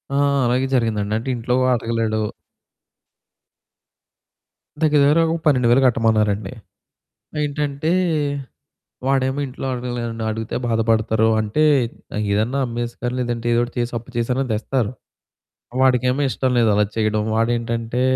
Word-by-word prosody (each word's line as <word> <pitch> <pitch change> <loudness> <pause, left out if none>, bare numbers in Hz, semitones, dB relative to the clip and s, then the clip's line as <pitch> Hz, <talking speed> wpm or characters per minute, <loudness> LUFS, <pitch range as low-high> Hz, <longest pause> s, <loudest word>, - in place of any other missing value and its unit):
ఆ! - - +2 0.3
అలాగే 125 +2 +1
జరిగిందండి 110 -4 0
అంటే 120 +4 -4
ఇంట్లో 120 +2 -1 0.2
అడగలేడు. 115 -1 -1 2.6
దగ్గర 150 -2 +4
దగ్గర 150 +3 +4
ఒక 170 - -2
12,000 125 -3 +4
కట్టమన్నారండి. 110 -4 +2 0.9
ఏంటంటే 145 +1 -2 1.2
వాడేమో 135 +1 +1
ఇంట్లో 130 0 -6
అడగలేడండి 120 -2 -4
అడిగితే 110 0 -4
బాధపడతారు 110 -1 +2
అంటే, 110 +8 0 0.7
ఏదన్నా 110 +7 0
అమ్మేసుకో 120 +1 -4
లేదంటే 120 -1 -2
ఏదో 120 - +3
ఒకటి 120 - -10
చేసి 120 0 -1
అప్పు 120 +3 -14
చేసినా 125 +3 0
తెస్తారు. 110 +1 -1 0.9
వాడికేమో 130 +1 +3
ఇష్టం 130 0 -1
లేదు 115 -2 +4
అలా 105 +1 +3
చేయడం. 110 -1 +1
వాడేంటంటే 115 +1 -1
120 Hz, 110 wpm, -21 LUFS, 110-130 Hz, 2.6 s, దగ్గర